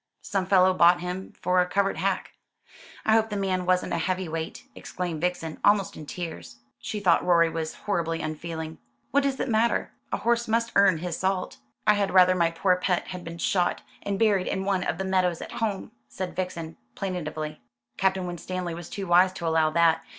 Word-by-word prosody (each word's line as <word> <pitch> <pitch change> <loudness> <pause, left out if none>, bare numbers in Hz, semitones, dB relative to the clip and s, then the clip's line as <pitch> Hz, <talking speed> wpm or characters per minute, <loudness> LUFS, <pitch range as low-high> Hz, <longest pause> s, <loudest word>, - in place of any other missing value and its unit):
Some 195 -2 -1
fellow 185 -1 +5
bought 175 -1 +5
him 180 +2 -5
for 180 0 +3
a 180 - 0
covert 195 0 0
hack." 190 +3 -1 0.7
"I 220 - +4
hope 220 0 +3
the 210 - -3
man 185 -2 -1
wasn't 185 0 +1
a 170 - 0
heavy 185 +2 -1
weight," 160 0 -5
exclaimed 175 -4 -5
Vixen, 175 -3 -2
almost 205 -3 +3
in 155 - -9
tears. 165 -8 -6 0.2
She 210 - -4
thought 180 -4 +3
Rorie 170 -2 +4
was 160 -1 -4
horribly 165 -5 0
unfeeling. 160 0 -5 0.3
"What 285 - +4
does 275 -1 -1
it - - -1
matter? 230 0 +1 0.2
A - - 0
horse 235 0 +1
must 230 +1 +1
earn 200 -4 +5
his 170 0 -4
salt." 190 0 -1 0.3
"I 210 - +6
had 200 -2 0
rather 185 0 +7
my 170 -2 +2
poor 180 +2 +2
pet 180 -1 -1
had 180 -1 -6
been 165 0 -7
shot, 175 +1 0 0.2
and 200 -1 -2
buried 205 -4 +2
in 190 0 -2
one 195 -2 +1
of - - -2
the 190 - -3
meadows 185 -3 +1
at - - -8
home," 210 -4 -2 0.2
said 180 +9 -5
Vixen 170 -3 -4 0.2
plaintively. 155 -6 -4 0.4
"Captain 190 -1 +1
Winstanley 175 0 -4
was 170 0 -8
too 195 - -5
wise 180 +1 +5
to 175 - -6
allow 160 -1 +3
that. 165 0 +3
180 Hz, 195 wpm, -26 LUFS, 170-195 Hz, 0.7 s, rather